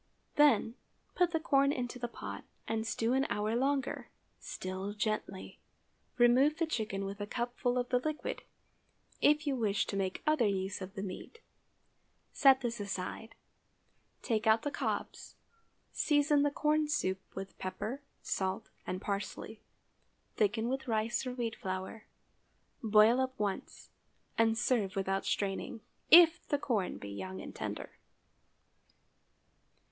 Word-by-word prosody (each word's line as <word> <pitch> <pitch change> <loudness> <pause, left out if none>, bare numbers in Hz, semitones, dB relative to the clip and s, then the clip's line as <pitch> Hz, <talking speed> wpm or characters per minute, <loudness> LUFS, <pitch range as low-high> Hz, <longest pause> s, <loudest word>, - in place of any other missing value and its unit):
Then, 295 -6 +5 0.4
put 355 -1 +3
the 325 -2 0
corn 280 -3 +3
into 250 -2 -3
the 240 - -2
pot, 235 - -7 0.2
and 225 0 -1
stew 225 +2 0
an 270 +2 +2
hour 215 +2 0
longer—still 235 -7 -3
gently. 215 -3 -3 0.6
Remove 255 +5 +5
the 330 - +1
chicken 215 -9 -2
with 200 +1 -6
a 205 - -3
cupful 245 +1 -1
of 245 0 -1
the 250 - +3
liquid, 310 +3 -3 0.8
if 300 +1 +4
you 280 -2 +1
wish 215 -5 +1
to - - -4
make 190 -1 -2
other 305 -7 +3
use 195 0 -2
of 190 +2 -7
the 195 - -4
meat. 200 - -7 0.9
Set 270 -1 +6
this 235 -2 -2
aside, 200 +3 -5 0.9
take 220 -3 0
out 220 +1 +5
the 290 - -1
cobs, - - -3 0.6
season 290 -1 +3
the 290 - +3
corn 300 +1 +1
soup 190 -11 0
with 195 0 -6
pepper, 205 +8 -4 0.2
salt, 190 +3 -2 0.2
and 185 +1 -3
parsley; 205 +2 -4 0.7
thicken 220 +2 +1
with 265 +1 -2
rice 230 +3 0
or 250 - -4
wheat 235 -3 -2
flour, 190 +3 -5 0.7
boil 220 +3 +5
up 260 0 -2
once, 205 -2 -4 0.4
and 225 0 +3
serve 235 -5 +1
without 195 0 -1
straining, 200 +3 -2 0.3
if 335 0 +8
the 290 - +1
corn 220 -9 -1
be 100 - -8
young 95 -1 -6
and - - -8
tender. - - -6
225 Hz, 135 wpm, -32 LUFS, 200-270 Hz, 0.9 s, if